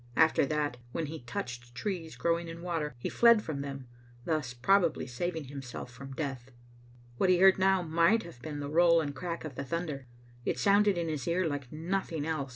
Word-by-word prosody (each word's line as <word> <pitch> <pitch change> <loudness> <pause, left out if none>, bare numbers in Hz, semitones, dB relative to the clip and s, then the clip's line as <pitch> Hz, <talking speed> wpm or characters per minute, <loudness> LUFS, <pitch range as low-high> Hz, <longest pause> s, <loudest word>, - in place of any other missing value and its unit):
After 160 -3 +4
that, 145 -3 -1 0.2
when 165 - -1
he 155 +2 -6
touched 120 0 -6
trees 170 +1 -4
growing 170 0 0
in 165 +1 -8
water, 160 -6 -2
he 120 - -4
fled 235 -2 +5
from 145 -3 -4
them, 135 -2 -6 0.4
thus 155 -6 -1
probably 170 +7 +2
saving 160 +6 -3
himself 135 -3 -7
from 135 +3 -9
death. 135 -4 -4 0.7
What 190 - +2
he 180 - +5
heard 190 +1 +6
now 190 -1 +3
might 170 +7 +3
have 120 -8 -12
been 145 +2 -5
the 140 - -4
roll 170 +1 +5
and 145 -3 -2
crack 170 +3 -4
of 155 - -6
the 140 - -4
thunder. 145 -2 -4 0.4
It - - -1
sounded 200 -1 +4
in 170 -1 -1
his 150 -5 -3
ear 175 +2 +1
like 140 -4 -4
noth 175 +5 -2
ing 155 -3 -2
else. 155 -4 -2
160 Hz, 200 wpm, -30 LUFS, 140-175 Hz, 0.7 s, heard